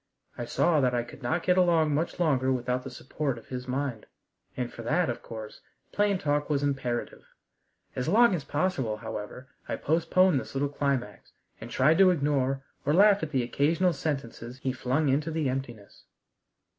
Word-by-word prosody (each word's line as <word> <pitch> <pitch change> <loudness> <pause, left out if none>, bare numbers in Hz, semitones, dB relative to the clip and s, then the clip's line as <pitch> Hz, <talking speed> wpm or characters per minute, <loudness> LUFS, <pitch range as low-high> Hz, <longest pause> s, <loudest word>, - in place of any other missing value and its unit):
I 120 - -5
saw 150 +5 +2
that 125 -2 +2
I 120 - 0
could 120 - -13
not 160 +7 -1
get 180 +1 +3
along 165 -4 +3
much 160 +5 -2
longer 135 -6 +2
without 125 0 -1
the 135 - -6
support 135 +1 -4
of 115 - -14
his 125 0 -5
mind, 130 -3 -3 0.5
and - - -3
for - - -8
that, - - +1
of - - -7
course, 110 -2 -9 0.3
plain 205 -1 +2
talk 145 -3 -1
was 145 -1 +1
imperative. 130 -4 -2 0.7
As 125 - -2
long 225 +5 +5
as 165 -6 -2
possible, 140 -8 -1
however, 110 +5 -7 0.2
I - - 0
postponed 165 +1 +2
this - - -9
little 140 +1 0
climax, 135 -7 -3 0.3
and 115 - -8
tried 145 +7 +3
to 190 -1 +7
ignore 140 -5 0 0.2
or 145 +3 +1
laugh 200 +1 +6
at 160 - -3
the 130 -5 0
occasional 165 +8 +1
sentences 130 -5 -4
he 130 0 -2
flung 130 +4 0
into 145 +4 +1
the 160 -3 -1
emptiness. 120 -6 -6
140 Hz, 180 wpm, -28 LUFS, 125-160 Hz, 0.7 s, to